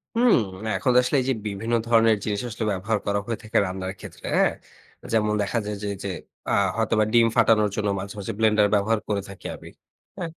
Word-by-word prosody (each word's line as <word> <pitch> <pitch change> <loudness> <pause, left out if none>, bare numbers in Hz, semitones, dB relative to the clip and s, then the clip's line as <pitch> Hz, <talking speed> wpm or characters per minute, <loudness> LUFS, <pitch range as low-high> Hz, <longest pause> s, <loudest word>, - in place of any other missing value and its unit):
হুম। 240 0 +5 0.4
এখন 105 +7 +1
আসলে 125 +4 -1
এই - - -4
যে - - +3
বিভিন্ন 105 +3 -3
ধরনের 115 -2 +4
জিনিস 105 -2 -2
আসলে 115 0 -4
ব্যবহার 100 +3 -1
করা 100 0 +1
হয়ে 115 0 -3
থাকে 110 - -1
রান্নার 95 0 -4
ক্ষেত্রে, - - -11
হ্যাঁ? - - +3 0.6
যেমন 105 -1 +2
দেখা 100 +4 0
যায় 105 0 -3
যে - - -2
এইযে 100 0 -5 0.4
আ - - +2 0.2
হয়তোবা 110 -1 +2
ডিম 115 -1 +6
ফাটানোর 105 -2 +4
জন্য 105 -1 0
মাঝে, 100 +1 -6
মাঝে, 100 - -4
ব্লেন্ডার 105 -2 +4
ব্যবহার 105 +2 +2
করে 100 -2 0
থাকি 100 - -12
আমি। - - -12 0.5
অ্যা 180 - -3
105 Hz, 195 wpm, -24 LUFS, 100-115 Hz, 0.6 s, ডিম